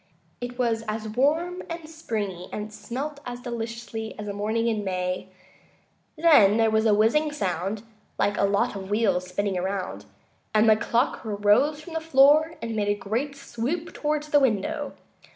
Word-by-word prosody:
It 245 Hz, 0 st, -5 dB
was 230 Hz, -3 st, +1 dB
as 215 Hz, +1 st, -3 dB
warm 320 Hz, +10 st, +1 dB
and 335 Hz, -2 st, -6 dB
springy, 210 Hz, -, -4 dB
and 210 Hz, 0 st, -5 dB
smelt 280 Hz, +7 st, -5 dB
as 245 Hz, -2 st, -6 dB
deliciously, 230 Hz, -2 st, -5 dB
as 210 Hz, -1 st, -6 dB
a 200 Hz, -, -3 dB
morning 215 Hz, +3 st, -1 dB
in 220 Hz, -3 st, 0 dB
May. 185 Hz, -1 st, -2 dB, 0.9 s
Then 290 Hz, -11 st, +6 dB
there 225 Hz, -1 st, +3 dB
was 220 Hz, +1 st, +3 dB
a 215 Hz, -, +5 dB
whizzing 265 Hz, +9 st, +3 dB
sound, 195 Hz, -, -2 dB, 0.3 s
like 205 Hz, -, +1 dB
a -, -, +2 dB
lot 200 Hz, +1 st, +1 dB
of 190 Hz, -1 st, -6 dB
wheels 205 Hz, -4 st, +1 dB
spinning 190 Hz, +1 st, -1 dB
around, 190 Hz, +1 st, -3 dB, 0.5 s
and 215 Hz, +1 st, +5 dB
the 220 Hz, -, +7 dB
clock 235 Hz, +4 st, 0 dB
rose 215 Hz, +8 st, +2 dB
from 325 Hz, +2 st, -10 dB
the 325 Hz, -, 0 dB
floor 310 Hz, +2 st, +5 dB
and 230 Hz, -1 st, -3 dB
made 205 Hz, -1 st, 0 dB
a 205 Hz, -, +2 dB
great 230 Hz, +8 st, -3 dB
swoop 275 Hz, +5 st, -4 dB
toward 300 Hz, 0 st, -1 dB
the 300 Hz, -1 st, +3 dB
window. 280 Hz, +5 st, 0 dB
225 Hz, 170 wpm, -26 LUFS, 205-290 Hz, 0.9 s, the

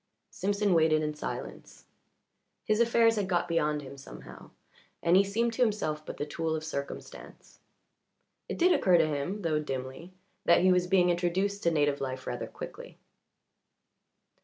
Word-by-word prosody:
Simpson 200 Hz, 0 st, 0 dB
waited 160 Hz, -2 st, +3 dB
in 150 Hz, 0 st, -2 dB
silence. 150 Hz, -, -7 dB, 0.8 s
His 215 Hz, 0 st, +1 dB
affairs 230 Hz, -1 st, +4 dB
had 200 Hz, -2 st, -1 dB
got 175 Hz, -1 st, +1 dB
beyond 150 Hz, -3 st, 0 dB
him 140 Hz, +1 st, -10 dB
somehow, -, -, -12 dB, 0.5 s
and 170 Hz, +1 st, +4 dB
he 195 Hz, -, +6 dB
seemed 230 Hz, +4 st, -1 dB
to 250 Hz, -, -3 dB
himself 200 Hz, -10 st, 0 dB
but -, -, -6 dB
the 145 Hz, -, -3 dB
tool 160 Hz, +1 st, -2 dB
of 155 Hz, -, -4 dB
circumstance. 140 Hz, -3 st, -8 dB, 0.9 s
It -, -, -4 dB
did 360 Hz, +1 st, +4 dB
occur 180 Hz, -2 st, +4 dB
to 165 Hz, -, +4 dB
him, 155 Hz, +7 st, -3 dB
though 155 Hz, -2 st, +1 dB
dimly, 135 Hz, +4 st, -6 dB, 0.3 s
that -, -, +5 dB
he 185 Hz, +1 st, +5 dB
was 180 Hz, 0 st, +2 dB
being 180 Hz, -1 st, +4 dB
introduced 185 Hz, +4 st, -1 dB
to 170 Hz, -, +2 dB
native 145 Hz, -2 st, +1 dB
life 130 Hz, -1 st, -4 dB
rather 120 Hz, -, -4 dB
quickly. -, -, -10 dB
170 Hz, 160 wpm, -29 LUFS, 150-200 Hz, 0.9 s, he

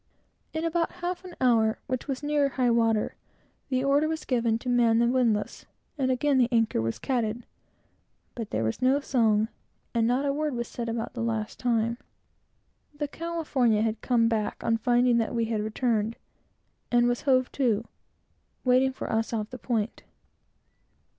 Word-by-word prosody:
In 320 Hz, +1 st, -3 dB
about 330 Hz, 0 st, 0 dB
half 360 Hz, +1 st, -2 dB
an 360 Hz, -, -9 dB
hour, 225 Hz, -4 st, +3 dB
which 255 Hz, +1 st, -3 dB
was 270 Hz, 0 st, -3 dB
near 290 Hz, -1 st, +2 dB
high 255 Hz, -2 st, +1 dB
water, 225 Hz, -2 st, +2 dB, 0.6 s
the 255 Hz, -1 st, 0 dB
order 285 Hz, +3 st, +3 dB
was 320 Hz, 0 st, -3 dB
given 230 Hz, -3 st, +1 dB
to 235 Hz, -, -10 dB
man 240 Hz, -2 st, +3 dB
the 235 Hz, -, +4 dB
windlass, 235 Hz, -4 st, 0 dB, 0.3 s
and 265 Hz, -4 st, 0 dB
again 265 Hz, +1 st, +2 dB
the 245 Hz, -1 st, +3 dB
anchor 225 Hz, -, +2 dB
was 115 Hz, 0 st, -2 dB
catted; 240 Hz, -2 st, -2 dB, 0.9 s
but 230 Hz, -4 st, -6 dB
not 235 Hz, -, 0 dB
a 280 Hz, -, +1 dB
word 300 Hz, -2 st, -1 dB
was 235 Hz, 0 st, -3 dB
said 235 Hz, -1 st, -5 dB
about 230 Hz, 0 st, -3 dB
the 245 Hz, -, -4 dB
last 225 Hz, -2 st, -2 dB
time. 235 Hz, -1 st, 0 dB, 1.0 s
The 295 Hz, 0 st, -2 dB
California 285 Hz, -9 st, 0 dB
had 225 Hz, -1 st, -1 dB
come 235 Hz, -3 st, +3 dB
back 220 Hz, -2 st, -1 dB
on 225 Hz, -, +2 dB
finding 245 Hz, +1 st, +3 dB
that 230 Hz, +1 st, -1 dB
we 230 Hz, -1 st, +1 dB
had 220 Hz, -1 st, -1 dB
returned, 220 Hz, 0 st, 0 dB, 0.8 s
and 240 Hz, 0 st, +4 dB
was 245 Hz, 0 st, 0 dB
hove 255 Hz, -3 st, +2 dB
to, 230 Hz, -5 st, +1 dB, 0.8 s
waiting 255 Hz, +1 st, +3 dB
for -, -, -6 dB
us, 225 Hz, 0 st, -1 dB
off 215 Hz, -2 st, -3 dB
the 255 Hz, -, -8 dB
point. 230 Hz, -3 st, -2 dB
240 Hz, 155 wpm, -27 LUFS, 225-265 Hz, 1.0 s, the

